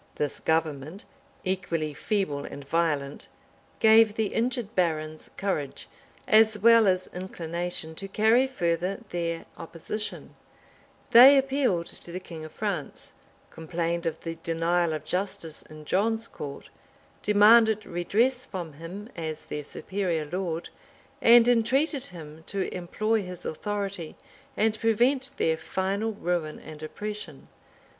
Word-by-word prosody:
This 145 -2 -2
government, 160 +2 -1 0.4
equally 170 -5 -2
feeble 150 -4 -1
and 140 -1 -9
violent, 145 -3 -1 0.5
gave 220 -1 +6
the 220 -2 -1
injured 235 -2 -1
barons 155 -3 -1
courage, 155 -9 -3 0.4
as 220 0 +5
well 230 +1 +6
as 185 -1 +2
inclination, 175 -2 -5
to 195 +5 -6
carry 220 +6 +3
further 180 -3 -1
their 170 -1 -3
opposition: 190 +6 -6 0.8
they 265 +4 +10
appealed 265 -10 +1
to 170 - -8
the 180 - -4
king 165 -4 -9
of 155 - -9
France; 200 -9 -4 0.4
complained 170 +1 -2
of 165 - -3
the 165 -1 -5
denial 165 0 +1
of 155 - -5
justice 180 -4 -3
in 155 0 -13
John's 225 +6 +1
court; 140 -1 -8 0.5
demanded 215 +1 +5
redress 235 +9 0
from 175 -5 -6
him 170 +8 -8
as 160 -2 -5
their 150 - -4
superior 170 +1 -3
lord; 170 0 -3 0.5
and 235 0 +7
entreated 260 +5 +2
him 160 -2 -10
to 195 -1 -2
employ 215 +5 0
his 180 -2 -8
authority, 200 -1 -4 0.4
and 220 0 +1
prevent 255 +5 +2
their 160 0 +1
final 195 +6 -2
ruin 175 -5 -2
and 155 -1 -11
oppression. 205 -2 -7
180 Hz, 125 wpm, -27 LUFS, 160-220 Hz, 0.8 s, they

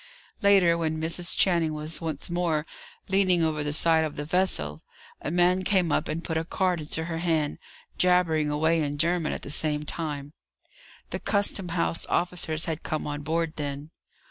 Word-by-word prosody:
Later, 190 -5 +5
when 160 -1 -1
Mrs. 170 +2 0
Channing 170 -4 +2
was 155 +2 -2
once 160 -2 -3
more 170 -3 0 0.4
leaning 185 -3 +3
over 155 -2 0
the 150 - -2
side 160 +1 +3
of 155 -2 -4
the 145 - -4
vessel, 145 - 0 0.4
a - - -3
man 180 +2 +3
came 185 -4 +2
up - - +1
and 160 +2 -3
put 160 - -2
a 160 - 0
card 180 +1 0
into 155 +1 -1
her 165 -1 -4
hand, 160 -4 0 0.4
jabbering 175 -4 +3
away 160 +2 +2
in 145 -1 -2
German 170 +1 +1
at - - -5
the 140 - -6
same 150 -1 0
time. 145 -3 -4 0.8
The - - -3
Custom 200 -3 0
House 165 -1 0
officers 175 -3 +1
had 160 -2 -3
come 155 - -3
on 145 0 -4
board 165 +2 -2
then. 145 +1 -5
160 Hz, 175 wpm, -26 LUFS, 150-175 Hz, 0.8 s, Later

